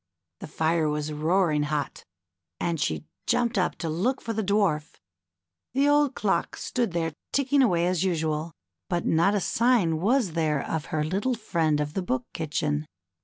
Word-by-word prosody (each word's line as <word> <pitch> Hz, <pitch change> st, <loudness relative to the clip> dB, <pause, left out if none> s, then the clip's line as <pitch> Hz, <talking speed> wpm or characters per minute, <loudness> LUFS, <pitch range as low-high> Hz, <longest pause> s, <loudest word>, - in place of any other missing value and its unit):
The -, -, -7 dB
fire 160 Hz, -1 st, +1 dB
was 150 Hz, 0 st, -2 dB
roaring 155 Hz, 0 st, +2 dB
hot, 145 Hz, -1 st, -3 dB, 0.5 s
and 170 Hz, -2 st, -1 dB
she 80 Hz, -2 st, -1 dB, 0.2 s
jumped 240 Hz, 0 st, +1 dB
up 180 Hz, -, 0 dB
to 165 Hz, -, -5 dB
look 195 Hz, +12 st, 0 dB
for 230 Hz, -, -4 dB
the 220 Hz, -, -1 dB
Dwarf. 190 Hz, -7 st, +1 dB, 0.8 s
The 275 Hz, +2 st, +3 dB
old 290 Hz, -2 st, +3 dB
clock 190 Hz, -5 st, 0 dB
stood 235 Hz, -7 st, -2 dB
there 165 Hz, -2 st, -1 dB, 0.2 s
ticking 280 Hz, 0 st, +2 dB
away 175 Hz, -9 st, +3 dB
as 180 Hz, -1 st, +1 dB
usual, 160 Hz, -3 st, -1 dB, 0.4 s
but 175 Hz, -, -1 dB
not 170 Hz, +6 st, +3 dB
a -, -, +2 dB
sign 210 Hz, -6 st, +2 dB
was 230 Hz, -1 st, +2 dB
there 155 Hz, -3 st, 0 dB
of 160 Hz, -1 st, -3 dB
her 155 Hz, -1 st, -1 dB
little 200 Hz, +11 st, 0 dB
friend 165 Hz, -9 st, 0 dB
of 150 Hz, 0 st, -2 dB
the 190 Hz, -, -1 dB
Book 130 Hz, -8 st, -2 dB
Kitchen. 150 Hz, -1 st, -2 dB
170 Hz, 170 wpm, -26 LUFS, 155-210 Hz, 0.8 s, The